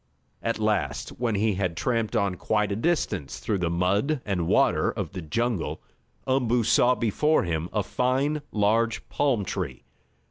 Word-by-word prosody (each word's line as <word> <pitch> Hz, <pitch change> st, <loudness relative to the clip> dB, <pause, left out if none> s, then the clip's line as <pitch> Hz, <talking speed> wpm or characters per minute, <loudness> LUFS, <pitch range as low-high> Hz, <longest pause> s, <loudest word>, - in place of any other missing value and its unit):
At 115 Hz, -, -1 dB
last, 95 Hz, -11 st, -1 dB
when 120 Hz, -3 st, 0 dB
he 105 Hz, +1 st, +2 dB
had 90 Hz, -3 st, -2 dB
tramped 115 Hz, +4 st, 0 dB
on 100 Hz, -4 st, +1 dB
quite 105 Hz, +3 st, 0 dB
a -, -, 0 dB
distance 110 Hz, -, -1 dB
through 100 Hz, -3 st, -1 dB
the 85 Hz, -2 st, 0 dB
mud 100 Hz, -, +1 dB
and 90 Hz, -5 st, -1 dB
water -, -, +3 dB
of -, -, -4 dB
the 95 Hz, -2 st, -6 dB
jungle, 115 Hz, +4 st, -1 dB, 0.5 s
Umboo 125 Hz, -3 st, +2 dB
saw 125 Hz, +3 st, +4 dB
before 120 Hz, +8 st, +2 dB
him 85 Hz, 0 st, -2 dB
a 105 Hz, -, 0 dB
fine, 135 Hz, +7 st, 0 dB
large 110 Hz, +2 st, +1 dB
palm 130 Hz, -9 st, +1 dB
tree. -, -, -4 dB
110 Hz, 155 wpm, -26 LUFS, 95-120 Hz, 0.5 s, saw